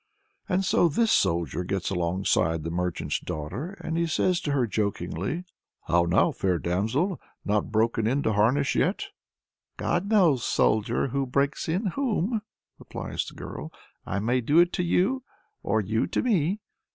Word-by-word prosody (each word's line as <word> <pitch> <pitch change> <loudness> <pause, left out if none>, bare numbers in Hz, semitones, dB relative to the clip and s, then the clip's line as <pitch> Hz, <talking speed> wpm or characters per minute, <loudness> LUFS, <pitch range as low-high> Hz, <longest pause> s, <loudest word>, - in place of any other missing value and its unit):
And 190 +1 +1
so 175 - +4
this 220 +8 +2
Soldier 85 - +1
gets 95 +1 -2
alongside 90 -1 +1
of 80 - -5
the 85 - -3
merchant's 90 0 -1
daughter, 95 - -5
and 165 0 -1
says 180 +2 +1
to 145 - -2
her 135 -3 +2
jokingly 105 - -2 0.4
"How 85 +1 +3
now, 85 - +3
fair 90 -2 0
damsel! 110 - -1 0.2
not 105 +2 0
broken 110 0 +1
in 135 +4 +1
to 110 - +1
harness 125 +7 +2
yet?" - - 0 0.7
"God 175 +4 -1
knows, 170 - +4
soldier, 110 +5 +1
who 135 +1 -1
breaks 140 +4 0
in 185 +7 0
whom," 230 -5 0 0.4
replies - - -5
the - - -10
girl. - - -7 0.3
"I - - -3
may 120 +5 +1
do 145 +7 +2
it 175 +1 +5
to 180 - 0
you, 190 +9 +2 0.4
or 110 +2 +1
you 110 +3 0
to - - -1
me." 200 -4 +1
125 Hz, 160 wpm, -26 LUFS, -, 0.7 s, it